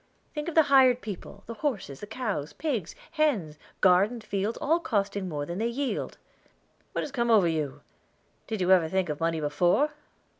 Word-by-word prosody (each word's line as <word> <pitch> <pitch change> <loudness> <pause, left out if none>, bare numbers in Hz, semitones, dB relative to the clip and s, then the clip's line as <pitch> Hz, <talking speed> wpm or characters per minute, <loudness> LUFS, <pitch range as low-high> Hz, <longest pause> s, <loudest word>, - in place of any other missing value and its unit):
"Think 300 +1 -4
of 335 - -7
the 320 - +7
hired 265 -3 +5
people 200 -1 -8
the 230 - -6
horses, 215 - -3
the 210 - -8
cows, 215 - -3
pigs, 240 - -3 0.2
hens, 235 - 0 0.2
garden, 195 +6 +4
fields 205 0 -2
all 315 +3 +2
costing 200 - -1
more 145 -3 -3
than 170 +5 -5
they 225 - +1
yield." 260 +3 -3 0.8
"What - - -1
has - - -6
come 240 -3 0
over 210 -6 +5
you? 155 -4 -2 0.7
Did 220 -3 -3
you 180 +1 +2
ever 175 -4 +5
think 190 -1 0
of 150 - -3
money 165 -1 0
before? 175 - +2
205 Hz, 180 wpm, -27 LUFS, 170-255 Hz, 0.8 s, the